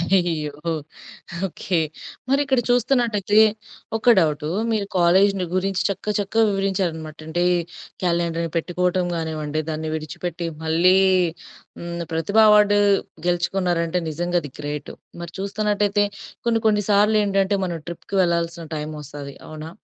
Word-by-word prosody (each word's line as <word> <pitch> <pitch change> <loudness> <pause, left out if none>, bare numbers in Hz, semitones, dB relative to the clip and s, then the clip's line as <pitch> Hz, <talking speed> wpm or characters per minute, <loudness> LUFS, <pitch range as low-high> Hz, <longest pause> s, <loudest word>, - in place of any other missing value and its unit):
అయ్యో! 165 -5 0 1.0
ఓకె. 180 0 -2 0.5
మరి 275 +1 +3
ఇక్కడ 265 -2 +2
చూస్తున్నట్టయితే 235 -4 +2 0.6
ఒక 240 +2 +5
డౌటు. 150 -3 0 0.2
మీరు 210 -3 0
కాలేజి‌ని 185 +2 +4
గురించి 190 0 0
చక్క, 195 -1 -4
చక్కగా 220 +3 +2
వివరించారనమాట, 180 -6 -2
అంటే 175 +2 0 0.6
క్యాలెండర్‌ని 170 -1 0
పెట్టుకోవటం 180 +2 0
కానివ్వండి, 155 -2 -2
దాన్ని 155 0 -3
విడిచిపెట్టి 165 +2 -5 0.2
మళ్ళీ 170 +4 +4 0.8
హ్మ్, 170 0 -5
ప్రతిభ 165 +6 -1
అవార్డు 210 -1 +6 0.5
గెలుచుకున్నారంటే 175 -1 0
నిజంగా 175 +3 -1
అది 145 - -7
గ్రేట్. 145 -1 -5 0.3
మరి 170 0 -7
చూస్తున్నట్టయితే 205 0 +1 0.4
కొన్ని 230 -1 +2
కొన్ని 210 -1 +3
సార్లు 210 +1 +4
ఏంటంటే 195 0 +1
మనం 175 -2 -3
ట్రిప్‌కి 170 +3 -7
వెళ్లాల్సిన 170 -1 0
టైమ్ 150 0 -4
వస్తాది. 140 -1 -8
అవునా? 155 0 -8
175 Hz, 120 wpm, -22 LUFS, 160-200 Hz, 1.0 s, అవార్డు